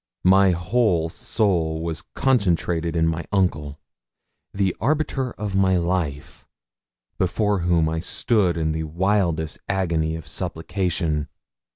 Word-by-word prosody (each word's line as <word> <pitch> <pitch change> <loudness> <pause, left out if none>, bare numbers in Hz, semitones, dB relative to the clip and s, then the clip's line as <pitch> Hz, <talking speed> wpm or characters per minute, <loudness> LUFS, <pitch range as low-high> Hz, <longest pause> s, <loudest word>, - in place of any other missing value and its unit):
My 95 +1 +6
whole 90 -1 +1
soul 80 -5 0
was 80 -1 -3
concentrated 85 -9 +1
in 80 -1 +2
my 80 +1 -1
uncle, 75 -7 0 0.7
the 95 -2 0
arbiter 140 -3 0
of 105 -2 -4
my 95 -1 +3
life, 85 -5 -2 0.8
before 105 +2 +1
whom 85 -2 +2
I 80 +1 -1
stood 95 0 +1
in 80 -1 0
the 80 0 -2
wildest 85 -2 0
agony 85 -5 0
of 80 -2 -8
supplication. 80 -3 -2
85 Hz, 115 wpm, -23 LUFS, 80-100 Hz, 0.8 s, My